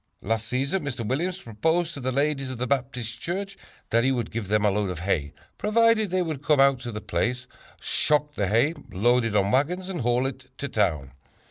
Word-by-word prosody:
"Last 115 +2 -1
season 140 +10 -1
Mr. 120 -5 -3
Williams 175 - -1
proposed 160 - 0
to 145 - -6
the 130 0 -1
ladies 140 0 0
of 130 - -5
the 125 - -1
Baptist 125 -3 -2
church 195 +3 -3 0.4
that 115 +1 +4
he 135 - +3
would 120 -3 -2
give 110 -3 -4
them 105 +1 +2
a 105 - +4
load 100 0 0
of 90 -2 -5
hay, 80 -6 0 0.3
provided 220 0 +3
they 185 0 +1
would 155 -5 -4
come 150 -1 +3
out 135 -1 +5
to 120 -1 -6
the 105 - -5
place, 125 +10 -1 0.3
shock 150 0 +1
the 100 -8 -1
hay, 115 - +3 0.2
load 120 +5 +3
it 110 -2 -2
on 100 0 +3
wagons 180 +8 +1
and 180 -4 -3
haul 120 +2 +2
it 130 -1 -5
to 140 - -3
town. 80 - 0
130 Hz, 215 wpm, -26 LUFS, 110-150 Hz, 0.4 s, out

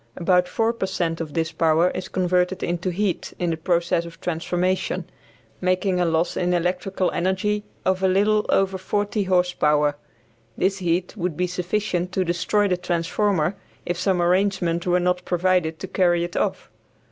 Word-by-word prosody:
About 180 0 +2
4 225 +5 0
per 195 -5 -3
cent 165 -3 -2
of 155 -3 -6
this 165 -1 0
power 165 +2 +3
is 185 - -5
converted 180 0 0
into 175 +1 -1
heat 185 0 -2
in 175 -1 0
the - - 0
process 170 +1 +1
of 170 -1 -11
transformation, 180 +1 -1 0.6
making 185 0 +1
a 180 - +2
loss 165 +1 +1
in 180 0 +1
electrical 180 +2 0
energy 190 +4 0 0.2
of 185 0 +1
a 190 - +3
little 210 +3 +2
over 195 -1 +2
40 205 +2 -1
horse 180 -1 +2
power. 150 -2 +2 0.6
This 195 +1 +1
heat 180 +1 -1
would 180 -5 -3
be 180 - +1
sufficient 180 0 -2
to 185 - +1
destroy 180 +4 +1
the 180 -2 +1
transformer 180 0 0 0.3
if 175 - -1
some 180 -1 +1
arrangement 180 -1 +1
were 180 0 +3
not 180 0 0
provided 175 -2 +1
to 190 - -6
carry 175 -2 +2
it 175 0 -5
off. - - -2
180 Hz, 170 wpm, -23 LUFS, 170-190 Hz, 0.6 s, power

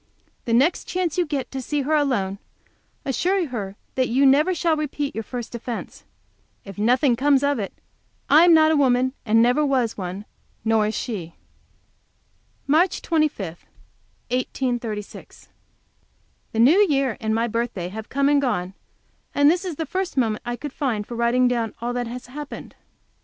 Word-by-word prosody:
The 230 - -1
next 275 +9 +3
chance 355 -4 -2
you 350 - +1
get 285 -3 -3
to 265 - -4
see 290 +3 -1
her 300 +4 -1
alone, 240 -10 +1 0.7
assure 360 +7 +1
her 200 -6 -5 0.2
that 255 -1 +1
you 265 +4 +3
never 300 +7 +4
shall 330 -1 +1
repeat 295 -2 -3
your 225 - -4
first 240 +1 -6
offence. 235 0 -6 0.6
If 195 0 -9
nothing 245 +4 +3
comes 275 +2 +3
of 285 -3 +1
it 200 - -3 0.6
I 310 +3 +7
am 350 - +6
not 315 -1 +6
a - - +3
woman, 260 -2 +2
and 225 +2 +5
never 250 +5 +3
was 255 -7 0
one; 185 +2 -5 0.4
nor 220 -1 +3
is 215 - -3
she. 180 -9 -5 1.3
MARCH 325 +6 +2
25, 310 - 0 0.9
1836. 240 -4 -4 1.0
The 225 - -3
New 285 - +6
Year 270 -5 +1
and 220 -1 -1
my 230 +1 +1
birthday 230 -6 -3
have 220 +3 -8
come 280 +1 +1
and 285 0 +4
gone, 195 -8 -1 0.6
and 285 +1 +6
this 355 +2 -1
is 360 -4 -4
the 320 - -3
first 370 +1 -3
moment 225 -4 +1
I 240 0 -3
could 290 +2 -7
find 230 -7 -2
for 240 - -8
writing 235 +2 +2
down 235 -3 -1
all 240 +1 -3
that 245 -1 -2
has 245 +1 -7
happened. 290 +3 -8
255 Hz, 170 wpm, -23 LUFS, 225-290 Hz, 1.3 s, I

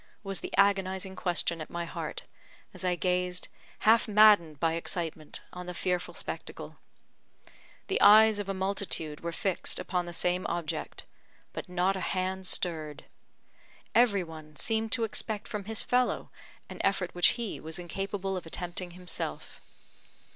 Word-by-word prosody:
was 195 -2 -2
the - - -6
agonising 190 -1 +2
question 170 -2 -1
at 155 - -7
my 170 0 -3
heart, 165 - -5 0.5
as - - -4
I 180 -1 +2
gazed, 180 0 -1 0.3
half 225 +2 +5
maddened 205 -8 +6
by 165 +1 +2
excitement, 165 -2 -3
on 180 0 -7
the 180 - -5
fearful 180 0 -1
spectacle. - - -6 1.1
The - - 0
eyes 215 0 +8
of 200 -1 -4
a - - 0
multitude 190 -5 -2
were 170 - -4
fixed 185 +2 -1
upon 180 -1 -2
the - - -5
same 180 +1 0
object 170 -2 -3 0.5
but - - -6
not 180 +2 +1
a - - -3
hand 185 0 -2
stirred. 155 -6 -1 0.9
Every 215 -6 +4
one 155 -2 -11
seemed 220 +7 0
to 235 - +6
expect 215 -1 -2
from 210 -2 -4
his 220 0 -1
fellow 250 0 +1 0.4
an - - -6
effort 195 -2 +1
which 175 - +5
he 235 -4 -4
was 160 0 -5
incapable 195 +2 -3
of 180 -3 -5
attempting 175 +1 -5
himself. 180 0 -5
185 Hz, 150 wpm, -30 LUFS, 170-200 Hz, 1.1 s, eyes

